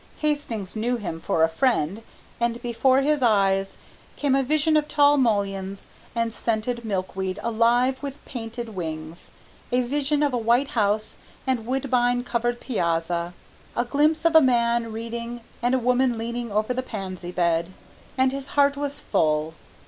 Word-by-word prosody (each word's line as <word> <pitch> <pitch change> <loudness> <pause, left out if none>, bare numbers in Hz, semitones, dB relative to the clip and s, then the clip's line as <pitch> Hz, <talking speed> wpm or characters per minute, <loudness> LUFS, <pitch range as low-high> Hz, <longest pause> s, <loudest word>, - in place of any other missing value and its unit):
Hastings 290 -11 -2
knew 240 +3 0
him 175 -7 -5
for 160 - +1
a - - +6
friend, 195 - 0 0.4
and 235 0 0
before 255 +3 +3
his 295 0 +1
eyes 195 -4 +2 0.4
there - - -17
came 285 -2 +2
a 270 - +4
vision 305 +3 +2
of 300 -1 +2
tall 290 -1 +5
mulleins 200 -6 -1 0.3
and 230 -1 0
scented 235 +2 -2
milkweed 190 -2 -2
alive 235 +3 +2
with 280 0 -7
painted 235 -2 -6
wings, 160 -3 -6 0.4
a 250 +1 +3
vision 290 +3 0
of 285 -3 +1
a 245 - +1
white 240 +5 +2
house 215 -4 0 0.3
and 250 -4 -1
woodbine 245 -2 +1
covered 240 0 -1
piazza, 170 -5 -1 0.4
a 240 - +2
glimpse 305 +5 +2
of 335 -1 +4
a 320 - +10
man 235 -3 +2
reading 235 +1 -5 0.2
and 245 +2 +2
a - - +3
woman 250 0 +2
leaning 235 0 -4
over 215 +4 0
the 255 - -1
pansy 185 -7 -6
bed, 170 -1 +1 0.5
and 260 0 +3
his 275 0 -5
heart 280 0 +5
was 285 0 -3
full. 155 0 +1
235 Hz, 160 wpm, -24 LUFS, 200-265 Hz, 0.5 s, a